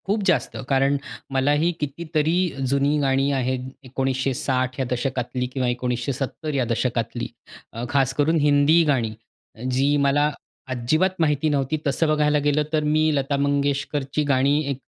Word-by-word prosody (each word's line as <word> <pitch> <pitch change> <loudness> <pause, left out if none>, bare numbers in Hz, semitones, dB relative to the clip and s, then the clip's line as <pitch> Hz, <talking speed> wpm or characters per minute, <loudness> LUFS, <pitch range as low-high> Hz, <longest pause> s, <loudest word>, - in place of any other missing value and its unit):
खूप 205 +2 +1
जास्त. - - +1
कारण 135 +1 +3 0.3
मलाही 145 +5 +2
कितीतरी 155 +2 -1 0.4
जुनी 140 +2 +2
गाणी 135 0 +2
आहेत 130 -1 -1 0.2
1960 130 0 -1
या 130 - 0
दशकातली 125 0 -2
किंवा 130 -2 0
1970 125 +4 -3
या 135 -3 +1
दशकातली. 120 0 -2 0.5
अ, 115 - -5
खास 135 -1 +2
करून 155 +4 +2
हिंदी 145 +3 +4
गाणी. 120 -7 +1 0.6
जी 135 +3 +2
मला 145 +2 +3 0.4
अजिबात 130 +9 +1
माहिती 155 -1 +2
नव्हती 145 +1 0
तसं 150 +4 +1
बघायला 150 -1 +2
गेलं, 145 +1 +1
तर 155 -1 +2
मी 155 +1 +2
लता 140 0 0
मंगेशकरची 140 0 0
गाणी 140 +1 +2
एक 140 - -2
140 Hz, 135 wpm, -23 LUFS, 130-150 Hz, 0.6 s, हिंदी